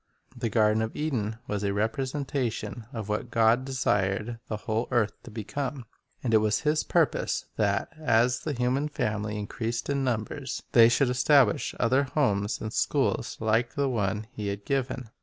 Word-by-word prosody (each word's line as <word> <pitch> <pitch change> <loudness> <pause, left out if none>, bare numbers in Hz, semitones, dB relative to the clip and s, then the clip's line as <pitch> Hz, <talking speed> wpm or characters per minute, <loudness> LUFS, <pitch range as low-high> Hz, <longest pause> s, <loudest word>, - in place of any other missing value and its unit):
The 120 -2 -2
garden 110 0 +3
of 110 0 -3
Eden 115 -8 -2
was 105 -1 -2
a 100 -1 0
representation 120 -1 -2
of 110 -6 -5
what 105 +3 -2
God 115 +2 +3
desired 110 -3 0
the 110 - -3
whole 110 +2 -2
earth 110 -3 +1
to - - -11
become, 125 +4 -4 0.4
and 120 -3 0
it 110 - +7
was 105 0 +1
His 155 0 +1
purpose - - +1
that, 100 -2 +1
as 120 -3 +3
the 155 - -3
human 130 +3 0
family 105 -5 -2
increased 115 +4 -3
in 140 -1 0
num 120 -4 +1
bers, 135 +4 -6
they 115 -1 +7
should 125 +2 +3
establish 125 -2 +3
other 130 +3 +3
homes 105 -8 0
and 110 +1 -5
schools - - 0
like 110 +2 +1
the 140 -1 +1
one 110 -2 -1
He 105 -5 -5
had 100 0 -4
given. 130 -3 -2
115 Hz, 170 wpm, -27 LUFS, 105-130 Hz, 0.4 s, it